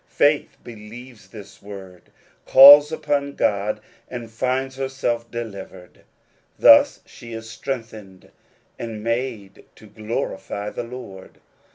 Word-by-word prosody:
Faith 145 0 +1
believes 115 +1 -12
this 100 -3 -13
word, 95 -3 -12 0.4
calls 145 +3 +9
upon 140 -2 -2
God, 105 +1 -1 0.3
and 120 -2 -8
finds 130 +3 -2
herself 130 -3 -3
delivered: 100 -6 -9 0.5
thus - - +6
she 115 -1 -12
is 110 0 -8
strengthened, 110 -5 -8 0.5
and 110 -2 -7
made 115 -4 -4
to - - -17
glorify 105 -1 -5
the - - -5
Lord. 115 -6 -11
115 Hz, 105 wpm, -21 LUFS, 105-130 Hz, 0.5 s, calls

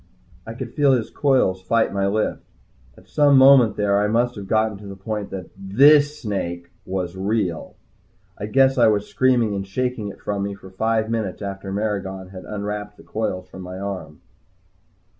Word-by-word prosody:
I 115 - -6
could 120 -1 -7
feel 145 -2 +4
his 120 -4 -1
coils 130 -10 +2
fight 110 +4 +1
my 100 0 0
lift. 105 +2 -1 0.6
At - - -19
some 145 -2 +4
moment 130 -5 +7
there 100 -1 +2
I 105 - +2
must 120 +3 +1
have 100 -4 -8
gotten 110 -2 0
the 100 - -7
point 105 +1 -5
that 95 -2 -7
this 145 +9 +4
snake 85 -5 -4 0.2
was 90 -1 -3
real. 95 -3 -2 0.6
I 105 - -5
guess 135 +3 +3
I 120 - +6
was 105 -1 +2
screaming 120 -4 +2
and 100 -1 -4
shaking 125 +1 -2
it 100 - -9
from 100 -1 -3
me 100 0 -3
for 95 -1 -14
five 110 +3 0
minutes 110 -4 -3
after 95 0 -5
Maragon 95 -2 -3
had 95 -1 -10
unwrapped 105 0 -5
the - - -15
coils 95 -4 -3
from 95 0 -11
my 90 0 -7
arm. 95 -6 -6
105 Hz, 180 wpm, -22 LUFS, 95-115 Hz, 0.6 s, moment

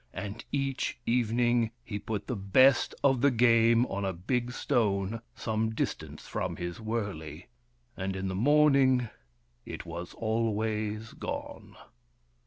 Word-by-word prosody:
And 105 +3 -5
each 135 -2 -1
evening 120 0 +2
he 105 -2 -5
put 105 -1 -4
the 125 - -3
best 115 +6 +4
of 135 -3 +3
the 140 - +6
game 115 -1 +4
on 100 -3 -4
a 95 -1 -1
big 120 +8 -2
stone 105 -3 0
some 110 0 -1
distance - - -4
from - - -3
his 85 +2 -5
wurley, 100 -8 -4 0.5
and 95 0 -3
in 95 0 -3
the 95 - -2
morning 135 +1 +4 0.5
it - - -7
was 85 +1 -7
always 110 -1 -1
gone. - - -6
110 Hz, 130 wpm, -29 LUFS, 100-120 Hz, 0.5 s, the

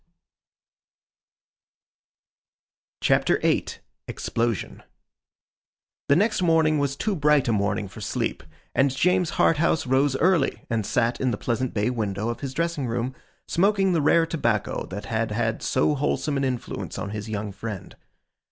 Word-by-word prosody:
CHAPTER - - +3
VIII - - +1 0.4
EXPLOSION 115 -3 -2 1.3
THE 140 - +6
next 210 +4 +2
morning 160 -3 +3
was 140 -1 0
too 210 +6 -1
bright 150 -4 +3
a - - +2
morning 100 -1 0
for - - -11
sleep, - - -2 0.3
and 135 +1 +3
James 180 +6 +1
Harthouse 160 -1 +2
rose 135 +1 +2
early, 170 -4 +2
and 110 -3 0
sat 120 0 0
in 130 - +2
the 110 - -1
pleasant 120 +2 -2
bay 105 +4 +1
window 110 -2 -2
of 120 0 -4
his 135 -2 -5
dressing 165 -5 -1
room, 120 +2 -2 0.3
smoking 195 +1 +2
the 165 - +2
rare 165 +3 +4
tobacco 120 - -1
that 100 +2 -6
had 110 +2 -1
had 115 +1 -1
so 130 +3 +2
wholesome 145 +1 -1
an 135 - 0
influence 125 -2 -4
on 100 - -4
his 105 +1 -5
young 105 -1 -3
friend. 100 -1 -7
130 Hz, 145 wpm, -25 LUFS, 110-155 Hz, 1.3 s, THE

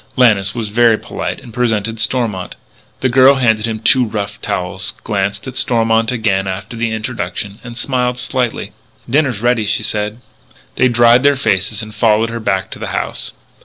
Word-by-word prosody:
Lannis 105 -5 +3
was 115 -3 -3
very 115 +1 +4
polite - - -5
and 115 - -13
presented 115 -2 -1
Stormont. 110 -7 -1 0.5
The 130 - +3
girl 130 +2 +6
handed 110 -5 +2
them 110 -1 -3
two 125 +3 +3
rough 105 -2 -4
towels, 90 +2 -2
glanced 100 -1 -2
at 130 - -7
Stormont 115 -2 +2
again 100 -5 0
after 95 +5 -5
the 115 0 -1
introduction, 110 -2 -4 0.2
smiled 125 -1 0
slightly. 125 -2 -2 0.4
"Dinner 145 +2 +2
is 110 -4 -5
ready," 120 -3 +2
she 105 +2 0
said. 105 +1 -2 0.6
They 130 - +4
dried 120 0 +5
their 145 +1 +4
faces 110 -4 0
and 110 0 -9
followed 110 0 +2
her 115 - -4
back 95 -3 -1
to - - -8
the - - -4
house. - - -3
115 Hz, 170 wpm, -16 LUFS, 105-125 Hz, 0.6 s, girl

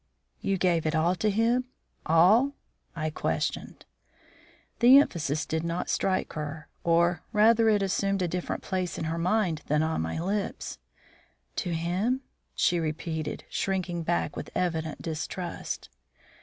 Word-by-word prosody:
"You 195 - 0
gave 170 -3 +2
it 155 - 0
all 165 +3 +3
to 215 - +1
him, 230 +4 +2 0.4
all?" 205 - +5 0.4
I 155 -1 -2
questioned. - - -3 0.9
The 250 +3 +9
emphasis 155 - +1
did 160 0 -2
not 170 +1 -2
strike 185 -1 0
her, 150 0 -5
or 170 0 +3
rather 225 +1 +5
it 205 -2 +3
assumed 195 0 0
a - - +1
different 180 +1 -3
place 185 -2 -2
in - - -3
her 165 +1 -2
mind 180 -3 +1
than 150 +1 +2
on 160 - 0
my 80 - -3
lips. 195 - -3 0.8
"To 175 -2 -1
him?" 185 +10 0 0.3
she 175 - +2
repeated, 160 0 -3
shrinking 185 -3 -2
back 170 +1 -1
with - - -6
evident 160 -4 -2
distrust. 165 +2 -4
175 Hz, 140 wpm, -28 LUFS, 160-195 Hz, 0.9 s, The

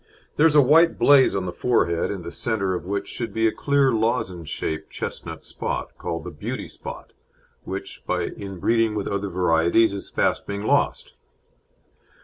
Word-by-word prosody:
There 160 - +5
is 155 - +1
a 145 - +8
white 165 +5 +5
blaze 140 -6 +5
on 95 -1 -1
the 90 - -3
forehead, 85 -5 +1
in 95 -3 -5
the 85 - -6
centre 100 0 0
of 90 - -4
which 100 +1 -3
should 115 -3 -4
be 110 0 +3
a - - +2
clear 140 0 +2
lozenge 110 - -1
shaped 80 +3 -3
chestnut - - -6
spot, - - -4
called 85 -2 -4
the 90 - -7
beauty 75 - -5
spot, - - -9 0.5
which - - -6
by - - 0
inbreeding 105 +3 -1
with 105 - -2
other 100 0 -2
varieties 90 +4 +3
is 100 - -5
fast - - 0
being 100 0 -4
lost. - - +1
100 Hz, 170 wpm, -23 LUFS, 90-115 Hz, 0.5 s, a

